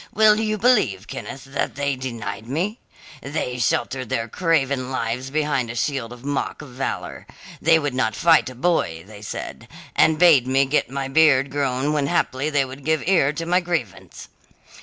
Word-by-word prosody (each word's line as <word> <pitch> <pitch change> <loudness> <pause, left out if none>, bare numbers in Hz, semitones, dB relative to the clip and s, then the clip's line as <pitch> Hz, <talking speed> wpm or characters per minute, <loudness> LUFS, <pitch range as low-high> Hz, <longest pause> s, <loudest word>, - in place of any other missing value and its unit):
Will 215 0 +5
you 215 -1 0
believe, 190 - +2
Kenneth, 135 - -7
that 135 0 -3
they 140 0 -1
denied 115 -4 -6
me? 180 - -2 0.4
They 130 -3 -3
sheltered 125 +2 -1
their 115 0 -1
craven 140 -3 0
lives 125 0 -3
behind 145 -4 0
a 115 - -5
shield 125 -1 -2
of 120 +1 -11
mock 145 +1 -3
valour. 130 -1 -5 0.3
They 165 0 +5
would 145 -4 -2
not 110 -4 0
fight 165 -5 +4
a 130 - -11
boy, 125 - 0
they 105 0 -12
said, 105 - -7 0.3
and 160 -1 +4
bade 155 -7 +6
me 135 +1 +3
get 140 +3 0
my 135 0 -3
beard 140 -2 +4
grown 140 0 0
when 145 -2 0
haply 145 -3 0
they 145 -3 +1
would 135 +2 -10
give 160 +1 0
ear 170 -7 +4
to 165 +2 -4
my 180 +2 +3
grievance. 170 - -4
135 Hz, 175 wpm, -22 LUFS, 125-160 Hz, 0.4 s, bade